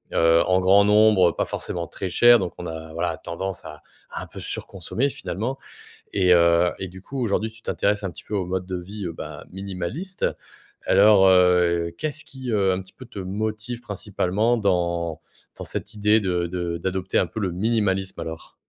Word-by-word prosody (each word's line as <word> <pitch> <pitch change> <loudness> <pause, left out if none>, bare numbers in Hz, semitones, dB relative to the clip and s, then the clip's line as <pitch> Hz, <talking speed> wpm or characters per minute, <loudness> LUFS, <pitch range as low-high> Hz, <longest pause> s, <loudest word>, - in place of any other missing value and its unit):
heu, 80 0 +5
en 95 0 +3
grand 100 +2 +5
nombre, 105 -4 +5
heu, - - -12
pas - - 0
forcément 85 -2 -4
très 95 - -5
chères. 120 +6 +7
Donc 90 -5 -3
on 90 - -5
a 80 0 -7
voilà, 85 -1 -2
tendance 95 +2 -5
à 75 -1 -10 0.3
à - - -5
un - - -10
peu - - -10
surconsommer 110 +9 -3
finalement. 120 +5 -4 0.6
Et 90 -2 +4
heu, 85 0 +5
et 95 - -4
du 95 +1 -12
coup, 135 +4 -6
aujourd'hui, 110 0 0
tu 115 0 -17
t'intéresses 105 -1 0
un 95 - -2
petit - - -13
peu 105 - -6
au 95 -3 -1
mode 95 0 -2
de 95 -1 -3
vie 100 +3 -7
heu, 85 - -3
bah, - - -8
minimaliste. 100 - -4 0.6
Alors 100 -1 +6
heu, 90 -2 +4
qu'est-ce 155 +1 -2
qui 130 -4 -7
heu, 95 -3 +3
un 90 - -1
petit 95 - -13
peu 130 - -11
te 105 - -10
motive 110 +5 -3
principalement 105 +2 0
dans 85 -5 0 0.4
dans - - -6
cette 105 - -4
idée 105 +1 +3
de 90 -3 0
de 85 -1 -3
d'adopter 95 +1 -1
un 90 - +2
peu 110 +6 -6
le 95 -3 0
minimalisme 95 -1 0
alors? 80 0 -8
95 Hz, 195 wpm, -24 LUFS, 90-105 Hz, 0.6 s, chères